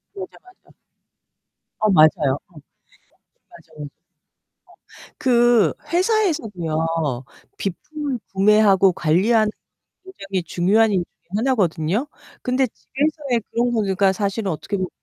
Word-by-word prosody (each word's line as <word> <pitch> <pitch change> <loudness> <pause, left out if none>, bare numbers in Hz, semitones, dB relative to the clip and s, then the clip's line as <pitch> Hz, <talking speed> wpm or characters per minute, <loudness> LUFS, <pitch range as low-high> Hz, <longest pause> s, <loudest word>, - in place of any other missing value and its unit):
맞아, 380 -1 -8
맞아. 370 +1 -22 1.1
어 215 - +2
맞아요. 155 -4 +4
어. - - -35
맞아, 145 - -14 1.1
맞아. 150 - -8
어. - - -5 1.3
그 240 -7 +3 0.2
회사에서도요. 290 - 0 0.7
비품을 285 - -4
구매하고 195 -1 +4
관리하는 210 +8 +2 0.6
굉장히 195 - -5
중요한 205 +6 +2
일 180 -3 +1
중에 - - -47
하나거든요? 210 - 0 0.3
근데 255 +1 +1
집에서의 275 0 -2
그런 240 +1 0
거는 220 -2 +1
그러니까 195 0 +2
사실은 200 0 -2
어떻게 200 +6 -4
보 185 -1 -2
210 Hz, 270 characters per minute, -21 LUFS, 185-255 Hz, 1.3 s, 맞아요